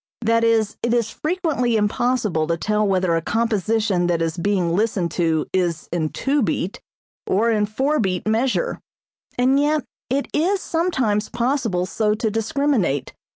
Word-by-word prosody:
That 230 0 +2
is, 225 -2 +2
it 235 0 +1
is 230 -2 0
frequently 305 -9 0
impossible 210 -6 0
to 170 0 0
tell 210 +3 0
whether 185 -3 +1
a 165 - 0
composition 215 -3 0
that 170 -1 +1
is 165 -1 -1
being 175 -2 0
listened 195 -5 0
to 165 -3 0
is 175 -3 0
in 160 -3 -1
two 280 - 0
beat, 195 -4 -2 0.5
or 225 +5 +2
in 210 -2 +1
four 270 +8 0
beat 185 -2 -1
measure; 250 - 0 0.6
and 260 +3 +3
yet 300 0 +1 0.3
it 275 +3 0
is 370 +6 +2
sometimes 260 - 0
possible 235 -7 0
so 210 +2 0
to 220 0 -1
discriminate. 225 - 0
220 Hz, 155 wpm, -21 LUFS, 185-255 Hz, 0.6 s, and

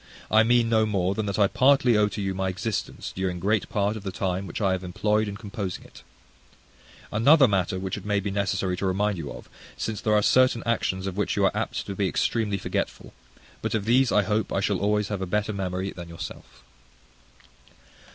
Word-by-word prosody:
I 110 - +6
mean 120 +1 +3
no 110 -1 +3
more 95 -3 0
than 110 0 -2
that 100 - -2
I 105 - +5
partly 130 +2 +4
owe 105 -1 +4
to 105 0 -4
you 95 -1 -1
my 95 0 -1
existence 100 +3 -4
during 90 -1 -2
great 100 +1 0
part 105 +1 0
of 110 - -6
the 95 -1 -4
time 95 +1 -2
which 85 - -5
I 100 -3 +2
have 95 0 -2
employed 105 +4 0
in 100 -1 -5
composing 100 -3 -5
it: - - -15 1.1
another 135 +6 +6
matter 95 -3 0
which 95 0 -4
it - - -14
may 105 -1 0
be 100 0 -3
necessary 95 -2 -1
to 95 - -1
remind 100 0 0
you 75 - -5
of; - - -10 0.3
since 110 -3 -3
there 110 -1 +2
are 105 - +3
certain 130 -1 +4
actions 95 -5 -1
of 95 0 -4
which 105 - 0
you - - +2
are - - +1
apt - - -2
to 100 - -5
be 100 0 0
extremely 105 -4 0
forgetful; - - -4 0.5
but - - -1
of 105 -3 -1
these 125 +2 +3
I 105 - +4
hope 105 +1 -1
I - - 0
shall - - 0
always 105 0 +1
have 100 -3 -3
a 95 - -2
better 105 +3 -1
memory 95 0 -3
than 85 -1 -9
yourself. 85 - -9
100 Hz, 215 wpm, -25 LUFS, 95-110 Hz, 1.1 s, I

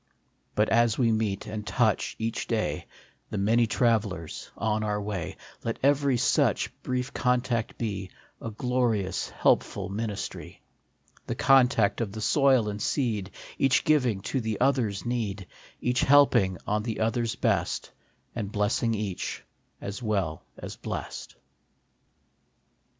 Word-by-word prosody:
But 105 +1 +3
as 115 -1 +3
we 120 -3 +3
meet 110 -3 -1
and 105 0 -5
touch, 110 -5 +1
each 115 +1 -3
day, - - -1 0.4
The - - -4
many 115 +4 +3
travellers 105 - 0
on 110 -1 0
our 105 -1 0
way, 95 -3 -4 0.3
Let 115 -1 -2
every 140 -2 +3
such 125 - +2
brief 125 +1 -2
contact 125 -2 0
be 100 -5 -3 0.3
A 115 - -4
glorious, 115 -4 0
helpful - - +1
ministry; 105 0 -5 0.6
The - - -2
contact 125 -6 +4
of 105 -4 -3
the 110 - -5
soil 130 -2 +4
and 105 0 -4
seed, 110 -9 0 0.3
Each 135 -1 +3
giving 130 -10 +2
to 130 +6 -2
the 110 -2 -2
other 130 -4 +3
s 100 +2 -6
need, 105 -5 -2 0.3
Each 125 +1 +1
helping 130 -10 +5
on 105 +1 0
the 110 0 -4
others 115 +1 0
best, - - 0 0.4
And 105 -4 -4
blessing, 105 +2 +1
each, 100 -4 -4 0.4
as 100 +5 -6
well 100 -8 -1
as - - -8
blest. - - -6
110 Hz, 135 wpm, -27 LUFS, 105-125 Hz, 0.6 s, helping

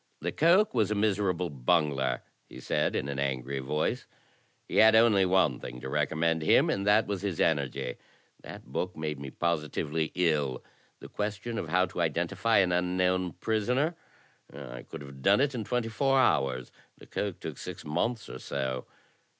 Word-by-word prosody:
"Lecoq 170 - +3
was 110 -5 +2
a 105 - 0
miserable 95 -4 0
bungler," 70 -1 +1 0.3
he - - -10
said, - - 0
in - - -1
an 70 -1 -3
angry 70 0 -2
vodce; 75 +4 -2 0.6
"he - - -3
had 110 0 +7
only 110 -4 +5
one 90 -9 +2
thing 60 0 -8
to 65 - -7
recommend 80 +3 0
him, 75 - +4
and 100 +1 -2
that 105 +2 +5
was 100 -3 -3
his 100 -5 -3
energy. 70 -5 0 0.4
That - - -10
book 90 -2 -4
made 75 -2 -3
me 70 -1 -6
positively 80 0 -1
ill. 75 -7 0 0.4
The - - -9
question 105 +3 -4
was 80 - -7
how 90 +2 +3
to 90 - -8
identi 85 +3 0
fy 110 +2 +3
an 90 -2 +1
unknown 90 0 +1
prisoner. 125 - 0 0.6
I 65 -4 -8
could 80 - -10
have 70 -1 -11
done 100 - +4
it 140 +1 +2
in 120 -3 -3
twenty 120 +1 -1
four 135 +4 +2
hours. 65 - +1 0.3
Lecoq - - -4
took - - -7
six - - -7
months 105 +10 -1
or - - -8
so. 65 -2 -3
85 Hz, 170 wpm, -29 LUFS, 70-105 Hz, 0.6 s, had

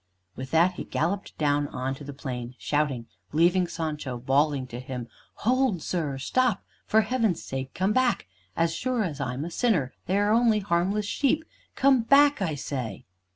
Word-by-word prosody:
With 130 +1 -6
that, 170 +4 +4
he - - -6
galloped 185 +5 -2
down 145 -1 +1
on 130 0 -3
to 135 - -9
the 145 - -7
plain, 125 -3 -6
shouting, 145 -5 -1 0.3
leaving 175 +3 +3
Sancho 150 -7 -4
bawling 135 +2 +1
to 120 -1 -7
him, 125 -2 -6 0.4
"Hold, 250 - +2
sir! 155 -6 -2
Stop! 225 - +1 0.2
For 220 - +5
Heaven's 220 -5 0
sake 135 0 -5
come 190 +3 +1
back. 255 - +2 0.3
As 165 0 +2
sure 245 +5 0
as 150 -7 -4
I'm 130 +2 -3
a 175 - -6
sinner, 170 - +1
they 190 +3 +2
are 205 +1 +2
only 230 -1 +4
harmless 200 +1 0
sheep. 285 +8 +1 0.3
Come 265 -2 +4
back, 280 +2 +5
I 165 -6 0
say." 130 -7 -5
165 Hz, 170 wpm, -27 LUFS, 135-215 Hz, 0.4 s, For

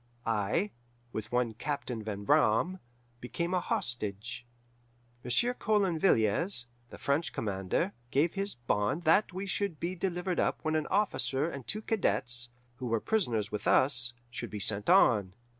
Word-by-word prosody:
I, 115 - 0 0.4
with 110 0 -5
one 120 -2 +1
Captain 125 -1 -3
Van 100 -2 -4
Braam, 115 - +3 0.4
became 170 +9 -3
a 185 - +3
hostage. 115 - -2 0.8
Monsieur 185 - +2
Coulon 200 -8 +1
Villiers, 120 - +2 0.2
the - - -10
French 140 +4 0
commander, 100 - -1 0.2
gave 150 +6 +2
his 200 +1 -1
bond 120 +6 0
that 175 +6 +4
we 190 +2 -4
should 195 -4 -2
be 175 +2 -2
delivered 180 0 -2
up - - +1
when 155 0 0
an 155 -1 0
officer 175 -8 +1
and 140 -7 -7
two 215 +1 -3
cadets, 120 - 0 0.3
who 130 -2 -4
were 115 -1 +1
prisoners 115 - 0
with 105 -1 -3
us, 125 -3 +3 0.2
should 120 -1 -5
be 105 - -5
sent 100 +1 -1
on. 105 - +5
130 Hz, 150 wpm, -31 LUFS, 110-180 Hz, 0.8 s, on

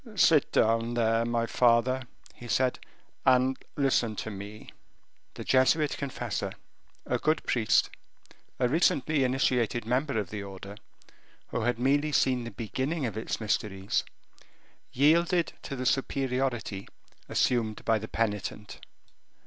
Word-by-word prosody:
"Sit 160 -7 +4
down, 115 +1 +2
there, 115 0 +2
my 115 0 0
father," 120 +2 +3 0.3
he 120 - -11
said, 130 +2 +1 0.4
"and 130 +1 +4 0.2
listen 130 -6 +1
to 110 - -5
me." 105 +2 -9 0.6
The - - -6
Jesuit 140 +4 +3
confessor, 120 -8 -4 0.5
a - - -1
good 155 +1 +1
priest, 110 -3 +2 0.7
a 125 - +2
recently 150 0 +2
initiated 125 -3 +1
member 130 +2 0
of 100 -4 -2
the 105 -1 -4
order, 100 0 -9 0.7
who - - -2
had 120 +1 0
merely 145 +5 +2
seen 125 -4 +2
the - - -5
beginning 130 +7 -3
of 110 -4 -3
its 110 - -3
mysteries, 100 -3 -1 0.9
yielded 165 +5 +3
to 140 - -6
the 130 -1 -4
superiority 130 -6 -1 0.4
assumed 115 -4 0
by 110 -1 +3
the 110 - -7
penitent. 105 -2 -3
120 Hz, 125 wpm, -28 LUFS, 110-135 Hz, 0.9 s, Sit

